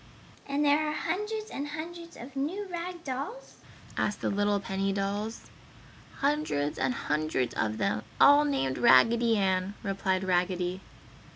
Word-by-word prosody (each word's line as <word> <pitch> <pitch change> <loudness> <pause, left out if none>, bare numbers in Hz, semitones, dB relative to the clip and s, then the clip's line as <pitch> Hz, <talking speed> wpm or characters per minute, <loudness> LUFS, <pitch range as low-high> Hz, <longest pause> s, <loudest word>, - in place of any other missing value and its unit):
"And 285 +1 0
there 295 +2 +3
are - - -2
hundreds 420 +7 -3
and 285 +1 -4
hundreds 335 +3 -7
of 255 +3 -10
the 270 - -4
new 375 +9 -2
rag 350 0 -5
dolls?" 285 - -6 0.4
asked 210 - -1
the - - 0
little 205 0 +1
penny 195 0 -1
dolls. 200 +3 -3 0.7
"Hundreds 280 - 0
and 135 - +1
hundreds 150 -4 -1
of 110 -1 -1
them, 105 0 0 0.2
all 285 +1 +8
named 205 - 0
Raggedy 230 - +5
Ann," 190 0 0
replied 190 -1 0
Raggedy. 180 0 0
220 Hz, 145 wpm, -29 LUFS, 185-300 Hz, 0.7 s, all